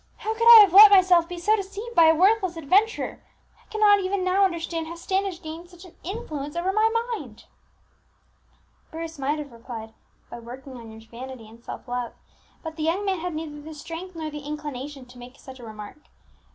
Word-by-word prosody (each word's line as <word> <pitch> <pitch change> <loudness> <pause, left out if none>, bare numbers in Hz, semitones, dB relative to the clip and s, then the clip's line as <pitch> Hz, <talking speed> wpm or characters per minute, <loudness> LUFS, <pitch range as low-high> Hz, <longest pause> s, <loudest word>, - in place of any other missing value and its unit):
How 440 - -3
could 460 +1 0
I 465 -2 +12
have 395 -4 +4
let 415 +2 +11
myself 365 -3 +5
be 355 - -6
so 420 +6 +2
deceived 410 +3 -7
by 335 -5 +6
a 320 0 +5
worthless 375 0 +2
adventurer? 390 +9 0 0.4
I - - -33
cannot 420 -1 +4
even 385 0 -2
now 370 +2 +2
understand 335 -2 -3
how 335 - -7
Standish 380 +1 -3
gained 325 +2 -9
such 355 0 -15
an 345 - -16
influence 310 -7 -6
over 360 +3 -1
my 435 +1 +3 0.2
mind!" 260 - -9 1.4
Bruce 325 -1 -8
might 280 +3 -1
have 295 -3 -7
replied 230 -1 -9 0.4
"By 240 - -8
working 255 +3 -11
on 230 -2 -11
your 220 0 -12
vanity 245 -1 -10
and 230 +2 -17
self - - -9
love;" 245 -1 -4 0.5
but 320 -1 -7
the 310 - -3
young 345 +6 -1
man 380 -3 -1
had 350 -1 -5
neither 305 -2 -7
the 310 +1 -10
strength 335 +4 -8
nor 315 -1 -5
the 295 - -7
inclination 290 -2 -7
to 250 0 -16
make 250 +2 -13
such 265 -1 -12
a - - -12
remark. 215 +3 -10
325 Hz, 200 wpm, -24 LUFS, 270-380 Hz, 1.4 s, I